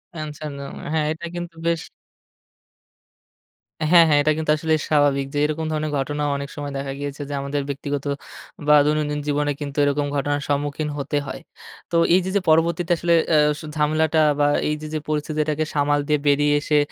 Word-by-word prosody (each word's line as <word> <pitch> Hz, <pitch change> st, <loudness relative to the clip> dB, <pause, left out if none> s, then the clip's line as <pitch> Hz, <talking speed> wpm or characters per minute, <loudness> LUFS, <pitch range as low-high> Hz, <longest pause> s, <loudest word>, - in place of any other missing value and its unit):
Answer 155 Hz, -1 st, -6 dB
দেওয়া। 140 Hz, -, -7 dB, 0.2 s
হ্যাঁ 155 Hz, -1 st, +1 dB
এটা 165 Hz, +2 st, -8 dB
কিন্তু 175 Hz, -1 st, -6 dB
বেশ 170 Hz, -2 st, +1 dB, 2.1 s
হ্যাঁ, 170 Hz, -2 st, +9 dB
হ্যাঁ 145 Hz, -, +5 dB
এটা 155 Hz, +1 st, +2 dB
কিন্তু 155 Hz, -1 st, 0 dB
আসলে 160 Hz, 0 st, 0 dB, 0.2 s
স্বাভাবিক 145 Hz, -2 st, +3 dB
যে -, -, -2 dB
এরকম 155 Hz, +1 st, -2 dB
ধরনের 155 Hz, -1 st, -2 dB
ঘটনা 145 Hz, +2 st, -2 dB
অনেক 140 Hz, 0 st, -5 dB
সময় 145 Hz, -1 st, -5 dB
দেখা 135 Hz, 0 st, -4 dB
গিয়েছে 145 Hz, 0 st, -5 dB
যে -, -, -4 dB
আমাদের 140 Hz, +1 st, -2 dB
ব্যক্তিগত, 140 Hz, 0 st, -3 dB, 0.6 s
বা 150 Hz, -, +7 dB
দৈনন্দিন 150 Hz, -1 st, 0 dB
জীবনে 145 Hz, 0 st, +1 dB
কিন্তু 140 Hz, 0 st, -5 dB
এরকম 145 Hz, 0 st, +1 dB
ঘটনার 145 Hz, 0 st, 0 dB
সম্মুখীন 145 Hz, +1 st, -1 dB
হতে 145 Hz, +1 st, -2 dB
হয়। -, -, -6 dB, 0.5 s
তো -, -, -1 dB, 0.2 s
এই 185 Hz, -, +6 dB
যে -, -, -2 dB
যে 200 Hz, -, +3 dB
পরবর্তীতে 170 Hz, +2 st, +2 dB
আসলে 170 Hz, 0 st, +1 dB, 0.2 s
আ -, -, +6 dB, 0.4 s
ঝামেলাটা 155 Hz, +1 st, +2 dB, 0.2 s
বা 145 Hz, -, +4 dB, 0.2 s
এই 150 Hz, -, 0 dB
যে, 155 Hz, -, -6 dB
যে 155 Hz, -, -1 dB
পরিস্থিতিটাকে 155 Hz, 0 st, -1 dB
সামাল 145 Hz, 0 st, +2 dB
দিয়ে 150 Hz, -1 st, +2 dB
বেরিয়ে 145 Hz, +1 st, +3 dB
এসে 150 Hz, -1 st, +1 dB
150 Hz, 175 wpm, -22 LUFS, 145-155 Hz, 2.1 s, হ্যাঁ